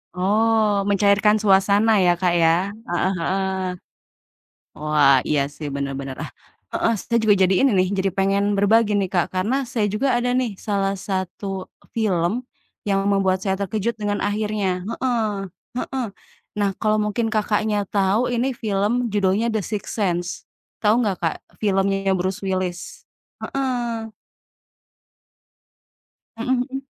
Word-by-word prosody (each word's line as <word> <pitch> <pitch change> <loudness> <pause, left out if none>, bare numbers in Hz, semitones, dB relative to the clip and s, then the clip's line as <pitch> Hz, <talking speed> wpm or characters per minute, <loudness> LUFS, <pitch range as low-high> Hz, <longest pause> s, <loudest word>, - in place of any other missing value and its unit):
Oh, 210 +1 +2
mencairkan 205 +1 +4
suasana 205 +2 +4
ya 175 -1 +4
Kak, 175 0 +1
ya? 170 +4 +3 0.2
Heeh 175 +2 0
heeh. 190 +3 0 1.3
Wah, 150 -3 +4
iya 150 -2 +2 0.2
sih, 150 - -6
bener 140 0 -2
bener, 135 -1 -6
ah, - - -6 0.5
heeh, 230 - +2
saya 235 -1 0
juga 205 -2 +6
jadi 190 +1 +4
ini 270 - +5
nih, 185 0 +3
jadi 195 0 +1
pengen 200 +1 +1
berbagi 215 +2 +3
nih 195 -2 +1
Kak, 175 -3 +1
karena 245 +9 0
saya 220 -3 0
juga 260 +5 +1
ada 245 +1 +1
nih 235 -5 -1
salah 195 -2 0
satu 190 0 -4 0.3
film, 210 +1 0 0.4
yang 195 -1 +2
membuat 190 -1 +2
saya 190 -1 0
terkejut 215 +3 -2
dengan 205 -1 -1
akhirnya, 205 -3 -1
heeh 230 -1 0 0.5
heeh. 260 0 -2 0.5
Nah 200 -1 +2
kalo 215 -1 +2
mungkin 225 +2 -1
Kakaknya, 215 0 +1
tau 200 +4 +2
ini 245 +2 0
film 220 +3 0
judulnya 205 +3 +2
The 220 -1 0
Sixth 210 -2 -4
Sense, 175 -3 0 0.5
tau 215 0 +3
gak 200 -4 0
Kak, 165 -2 0 0.2
filmnya 195 -1 +1
yang 190 - +3
Bruce 190 +2 -2
Willis? 185 -2 -3 0.4
Heeh. 265 -2 -1 2.6
Mhm 230 +3 -4 0.2
mhm. 270 +1 -6
200 Hz, 140 wpm, -22 LUFS, 190-220 Hz, 2.6 s, juga